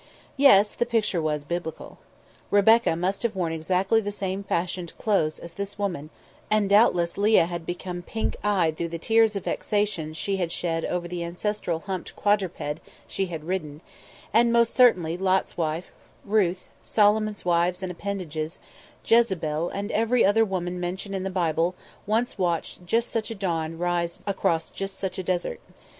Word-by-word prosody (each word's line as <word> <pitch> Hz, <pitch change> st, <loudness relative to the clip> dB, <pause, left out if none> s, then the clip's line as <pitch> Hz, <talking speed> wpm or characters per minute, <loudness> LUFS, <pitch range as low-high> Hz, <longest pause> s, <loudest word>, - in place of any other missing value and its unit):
Yes; 215 Hz, -7 st, +6 dB
the 240 Hz, -, -1 dB
picture 215 Hz, -7 st, +1 dB
was 150 Hz, -2 st, -1 dB
biblical. 170 Hz, +1 st, -5 dB, 0.5 s
Rebecca 220 Hz, -1 st, +5 dB
must 185 Hz, +4 st, -1 dB
have 235 Hz, -3 st, -1 dB
worn 170 Hz, -3 st, -1 dB
exactly 185 Hz, +7 st, +1 dB
the 205 Hz, -1 st, -3 dB
same 195 Hz, -1 st, -3 dB
fashioned 175 Hz, -2 st, -3 dB
clothes 175 Hz, -8 st, +1 dB
as 170 Hz, 0 st, -10 dB
this 200 Hz, +2 st, -5 dB
woman, 175 Hz, -7 st, -3 dB, 0.4 s
and 215 Hz, -1 st, +2 dB
doubtless 195 Hz, -4 st, +3 dB
Leah 210 Hz, -4 st, +5 dB
had 170 Hz, -1 st, -6 dB
become 175 Hz, 0 st, -4 dB
pink 220 Hz, +5 st, -3 dB
eyed 185 Hz, -6 st, +2 dB
through 170 Hz, -, -2 dB
the 170 Hz, -, -4 dB
tears 225 Hz, +4 st, +3 dB
of 200 Hz, -, -3 dB
vexation 205 Hz, -7 st, -1 dB
she 195 Hz, +5 st, -2 dB
had 175 Hz, -3 st, -1 dB
shed 165 Hz, -2 st, -1 dB
over 175 Hz, -1 st, -2 dB
the 175 Hz, 0 st, -4 dB
ancestral 175 Hz, -1 st, -2 dB
humped 190 Hz, -2 st, -5 dB
quadruped 190 Hz, -7 st, 0 dB, 0.3 s
she 195 Hz, -, -2 dB
had 165 Hz, -3 st, -6 dB
ridden; 155 Hz, -4 st, -4 dB, 0.5 s
and 235 Hz, +2 st, +5 dB
most 235 Hz, -1 st, +3 dB
certainly 180 Hz, -10 st, +4 dB
Lot's 190 Hz, 0 st, +1 dB
wife, 165 Hz, +1 st, -2 dB, 0.3 s
Ruth, 195 Hz, -3 st, +1 dB
Solomon's 210 Hz, -1 st, +2 dB
wives 175 Hz, +1 st, +1 dB
and 185 Hz, -, -3 dB
appendages, 170 Hz, -4 st, -4 dB, 0.5 s
Jezebel, 175 Hz, -9 st, +2 dB
and 200 Hz, +2 st, -4 dB
every 230 Hz, +3 st, +3 dB
other 215 Hz, +3 st, +4 dB
woman 180 Hz, -3 st, -2 dB
mentioned 185 Hz, +3 st, -4 dB
in 190 Hz, -, -2 dB
the 190 Hz, -, -2 dB
Bible 175 Hz, -1 st, 0 dB, 0.3 s
once 225 Hz, +1 st, 0 dB
watched 175 Hz, 0 st, -2 dB
just 230 Hz, +5 st, +1 dB
such 225 Hz, 0 st, -2 dB
a 225 Hz, -, -5 dB
dawn 165 Hz, -4 st, -2 dB
rise 175 Hz, 0 st, -1 dB
across 170 Hz, -5 st, 0 dB
just 195 Hz, 0 st, -5 dB
such 190 Hz, -1 st, -3 dB
a -, -, -3 dB
desert. 180 Hz, -1 st, -2 dB
185 Hz, 165 wpm, -25 LUFS, 170-205 Hz, 0.5 s, Yes